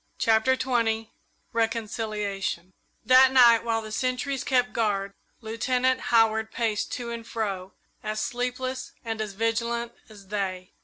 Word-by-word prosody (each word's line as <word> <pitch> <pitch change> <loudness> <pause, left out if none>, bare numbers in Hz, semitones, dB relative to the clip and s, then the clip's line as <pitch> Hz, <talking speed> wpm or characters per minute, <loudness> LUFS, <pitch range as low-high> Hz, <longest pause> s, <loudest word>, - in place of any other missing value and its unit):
CHAPTER 225 +4 +3
XX 225 -4 0 0.4
RECONCILIATION 215 -5 -2 0.3
That 260 +1 +7
night, 240 -3 +7
while 225 -1 -1
the 215 - -8
sentries 255 +4 -1
kept 245 -2 +1
guard, 200 -3 0 0.3
Lieutenant 250 +3 0
Howard 220 -1 +3
paced 225 -3 -1
to 240 -2 -4
and 230 -1 -5
fro, 200 -5 -4 0.3
as 215 0 -3
sleepless 250 +1 -3
and 225 -1 -3
as 210 -2 -4
vigilant 235 +2 -1 0.2
as 200 -3 -15
they. 185 -3 -3
225 Hz, 125 wpm, -26 LUFS, 215-245 Hz, 0.4 s, That